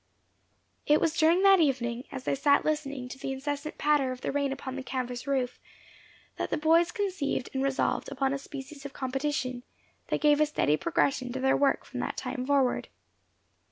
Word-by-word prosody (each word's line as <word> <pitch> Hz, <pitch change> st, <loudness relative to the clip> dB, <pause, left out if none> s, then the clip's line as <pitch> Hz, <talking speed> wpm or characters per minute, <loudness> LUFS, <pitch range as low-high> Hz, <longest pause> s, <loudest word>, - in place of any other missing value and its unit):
It 300 Hz, +1 st, +5 dB
was 330 Hz, 0 st, +1 dB
during 335 Hz, +4 st, +4 dB
that 390 Hz, -1 st, +7 dB
evening, 250 Hz, -5 st, 0 dB
as 265 Hz, -1 st, -6 dB
they -, -, 0 dB
sat 280 Hz, +1 st, +3 dB
listening 285 Hz, -4 st, -2 dB
to 265 Hz, -, -9 dB
the 270 Hz, -, -3 dB
incessant 285 Hz, +3 st, -4 dB
patter 290 Hz, -3 st, +2 dB
of 255 Hz, 0 st, -7 dB
the -, -, -2 dB
rain 280 Hz, -1 st, 0 dB
upon 265 Hz, -1 st, -5 dB
the 270 Hz, -, -4 dB
canvas 255 Hz, -1 st, -4 dB
roof, 260 Hz, -3 st, -1 dB, 0.8 s
that -, -, -2 dB
the -, -, 0 dB
boys 330 Hz, +3 st, +4 dB
conceived 375 Hz, -, -2 dB
and 265 Hz, -, -1 dB
resolved 270 Hz, -1 st, 0 dB
upon 270 Hz, 0 st, 0 dB
a 275 Hz, -, -2 dB
species 275 Hz, 0 st, -9 dB
of 280 Hz, -1 st, -7 dB
competition, 265 Hz, -1 st, -2 dB, 0.5 s
that -, -, 0 dB
gave 295 Hz, -1 st, +4 dB
a 305 Hz, -, +4 dB
steady 150 Hz, -, +2 dB
progression 275 Hz, -, 0 dB
to 260 Hz, -, -3 dB
their 265 Hz, +1 st, +3 dB
work 280 Hz, -1 st, +2 dB
from -, -, -7 dB
that -, -, -3 dB
time 255 Hz, -2 st, -4 dB
forward. 275 Hz, -3 st, +2 dB
275 Hz, 190 wpm, -28 LUFS, 260-300 Hz, 0.8 s, that